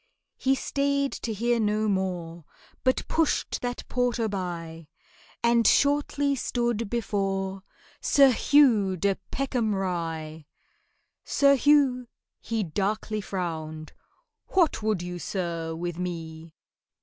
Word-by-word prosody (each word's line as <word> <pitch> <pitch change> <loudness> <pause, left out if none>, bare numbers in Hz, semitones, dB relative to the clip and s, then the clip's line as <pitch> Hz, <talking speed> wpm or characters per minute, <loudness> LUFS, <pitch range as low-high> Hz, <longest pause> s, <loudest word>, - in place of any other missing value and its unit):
He 265 0 +2
stayed 280 0 0
to 230 - -4
hear 235 +3 0
no 215 0 +1
more, 180 -4 -2 0.4
But 255 0 +1
pushed 325 -2 0
that 245 0 -4
porter 245 -2 0
by, 170 -5 -5 0.6
And 235 -1 +4
shortly 285 0 +2
stood 235 -3 -1
before 195 -4 -2 0.4
SIR 275 -2 +5
HUGH 230 -8 +4
DE 195 +2 +1
PECKHAM 245 -6 -1
RYE. 165 -5 -4 0.8
SIR 280 0 +4
HUGH 270 -3 +3 0.3
he 225 -2 -2
darkly 210 +4 -2
frowned, 160 -5 -5 0.5
"What 345 -11 +2
would 215 -5 0
you, 180 0 -5
sir, 170 -3 -3
with 175 +1 -4
me?" 165 -2 -6
205 Hz, 110 wpm, -26 LUFS, 175-245 Hz, 0.8 s, SIR